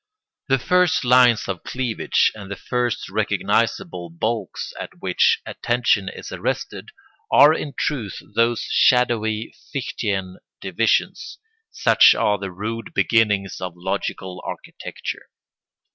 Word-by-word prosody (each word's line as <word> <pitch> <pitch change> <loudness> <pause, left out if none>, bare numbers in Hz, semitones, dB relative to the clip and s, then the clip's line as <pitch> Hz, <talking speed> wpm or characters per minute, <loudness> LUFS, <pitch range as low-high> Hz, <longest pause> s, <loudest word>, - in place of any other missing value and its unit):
The 135 - +3
first 180 +5 +2
lines 125 -2 +5
of 95 -3 -4
cleavage 125 -3 0
and 100 -3 -10
the 100 - -4
first 125 +2 -2
recognisable 85 -2 -1
bulks 110 +7 -3
at - - -8
which - - +2
attention 120 -5 0
is - - -9
arrested - - -4 0.4
are 150 +2 +7
in 145 -4 -5
truth 120 -10 -2 0.2
those 115 +1 +2
shadowy 115 -3 +2 0.2
Fichtean 100 -8 -3 0.2
divisions: - - -1 0.3
such - - +5
are 105 -1 +1
the 100 0 -5
rude 105 +5 -6
beginnings 100 -1 +1
of 90 -2 -4
logical 95 0 -4
architecture. - - -7
110 Hz, 115 wpm, -22 LUFS, 95-125 Hz, 0.4 s, are